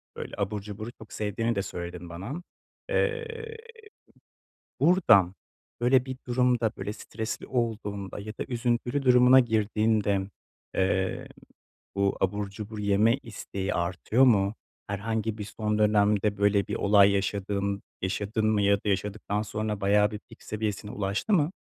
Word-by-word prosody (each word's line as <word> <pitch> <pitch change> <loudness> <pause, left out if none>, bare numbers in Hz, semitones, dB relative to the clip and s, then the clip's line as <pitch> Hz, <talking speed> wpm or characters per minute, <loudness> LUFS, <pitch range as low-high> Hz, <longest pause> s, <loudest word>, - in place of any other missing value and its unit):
böyle - - -7
abur 100 0 -2
cuburu 105 +2 -7
çok 110 -2 -14
sevdiğini 115 +2 -1
de 100 - 0
söyledin 90 -1 -6
bana. 115 - -6 0.5
Eee, 460 -2 -2 1.2
buradan 110 - +5 0.5
böyle 125 +1 +4
bir 130 -1 -5
durumda, 120 -2 +2
böyle 105 - -4
stresli 110 +1 -6
olduğunda 105 -6 -3
ya 110 +1 -6
da - - -2
üzüntülü 120 +2 0
durumuna 125 0 +7
girdiğinde, 110 -3 +1 0.5
eee, 95 0 0 0.7
bu 100 0 +1
abur 100 +1 -1
cubur 105 +1 -7
yeme 105 +4 +3
isteği 100 -6 -5
artıyor 90 +9 +2
mu? 100 -4 +3 0.3
Herhangi 110 +2 -2
bir 105 - -4
son 105 0 -2
dönemde 105 -1 +3
böyle 100 -1 +3
bir - - -3
olay 100 -1 +5
yaşadın 100 0 -1 0.2
yaşadın 105 +3 -1
mı 110 -2 +2
ya 100 0 +4
da 100 - -6
yaşadıktan 105 +1 -1
sonra 105 -1 -3
bayağı 105 +2 +3
bir 105 - -5
pik - - -15
seviyesine 105 -1 -3
ulaştı 105 - -2
mı? 165 -3 +3
105 Hz, 135 wpm, -27 LUFS, 100-115 Hz, 1.2 s, durumuna